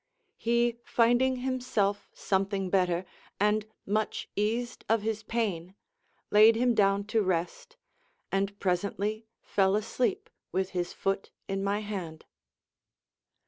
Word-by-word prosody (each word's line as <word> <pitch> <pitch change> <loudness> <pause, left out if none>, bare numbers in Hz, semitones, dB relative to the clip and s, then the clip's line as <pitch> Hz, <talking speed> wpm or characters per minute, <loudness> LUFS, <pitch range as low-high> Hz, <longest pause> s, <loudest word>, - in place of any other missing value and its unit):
He, 235 0 +2
finding 245 +3 +3
himself 250 -6 -1
something 195 -1 -1
better, 180 -2 +2 0.3
and 210 +1 +2 0.2
much 215 +2 -1
eased 230 +4 -1
of 225 -1 +3
his 220 -1 -1
pain, 195 -6 -2 0.6
laid 215 +2 +7
him 245 +1 +3
down 200 -2 +3
to 215 +2 +1
rest, 185 - -2 0.5
and 200 +1 -1
presently 200 +4 -1 0.2
fell 195 0 +2
asleep 250 - -1 0.2
with 190 0 -1
his 175 -1 -2
foot 195 0 -2 0.2
in 195 0 -2
my 200 +1 0
hand. 185 -7 -6
205 Hz, 115 wpm, -29 LUFS, 195-230 Hz, 0.6 s, laid